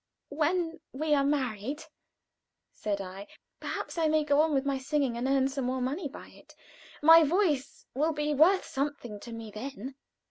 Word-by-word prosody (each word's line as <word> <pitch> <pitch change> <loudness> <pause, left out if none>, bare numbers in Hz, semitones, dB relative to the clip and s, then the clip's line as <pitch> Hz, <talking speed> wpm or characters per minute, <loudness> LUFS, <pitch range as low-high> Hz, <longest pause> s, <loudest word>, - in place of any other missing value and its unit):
"When 325 +2 0
we 300 +3 0
are 280 -1 +4
married," 270 -1 -1 0.9
said 205 -2 -3
I, 195 +1 -7 0.3
"perhaps - - -4
I 320 - +3
may 310 0 +3
go 290 0 +3
on 320 0 +2
with 275 -1 +1
my 275 -1 0
singing, 275 -2 0
and 240 +2 -2
earn 270 -1 +3
some 270 -1 -3
more 260 +1 -1
money 280 +7 -2
by - - -11
it. - - -18 0.5
My 325 +1 +9
voice 310 -4 0
will 305 +5 +1
be 300 -1 -1
worth 345 +7 +4
something 270 -6 -4
to 235 - -10
me 225 -2 -7
then." 260 +3 -7
280 Hz, 175 wpm, -29 LUFS, 255-310 Hz, 0.9 s, My